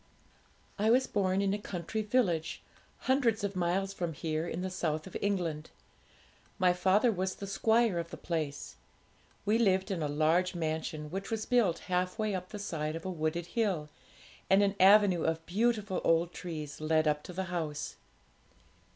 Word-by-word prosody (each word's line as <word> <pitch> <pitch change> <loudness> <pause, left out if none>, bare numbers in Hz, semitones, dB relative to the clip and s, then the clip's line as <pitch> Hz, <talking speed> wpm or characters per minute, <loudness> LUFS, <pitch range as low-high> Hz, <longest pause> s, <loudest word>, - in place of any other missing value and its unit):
'I 215 +2 +3
was 255 +3 +5
born 195 -1 +1
in 195 0 +1
a 205 - -2
country 200 +2 -4
village, 200 -8 0 0.4
hundreds 240 -5 +2
of 200 -1 -2
miles 185 +2 0
from 175 -4 -3
here, 155 +2 -2
in 175 - -4
the 185 - -2
south 155 -4 -2
of 190 - -11
England. 170 -6 -1 0.9
My 185 -2 +4
father 190 +6 +3
was 185 -2 -2
the 200 - -7
squire 220 0 +2
of 170 0 -4
the - - -8
place. 145 - -4 0.7
We 215 +3 +3
lived 190 -3 +2
in 180 -4 -2
a 150 - 0
large 160 +5 +2
mansion, 155 -2 -3
which 195 +2 -4
was 220 -1 -2
built 230 -9 +3
half 180 +1 0
way 215 -2 0
up 185 -1 -4
the 210 - -6
side 160 -6 -3
of 165 - -7
a 190 - -2
wooded 165 0 -2
hill, 185 -7 -1 0.6
and 195 +1 +6
an 200 -1 +2
avenue 195 -2 +6
of 160 0 -1
beautiful 210 0 0
old 165 +1 +2
trees 155 -4 -6
led 155 0 +2
up 150 0 +1
to - - -9
the 190 +2 -2
house. 155 -4 -3
185 Hz, 175 wpm, -31 LUFS, 160-205 Hz, 0.9 s, and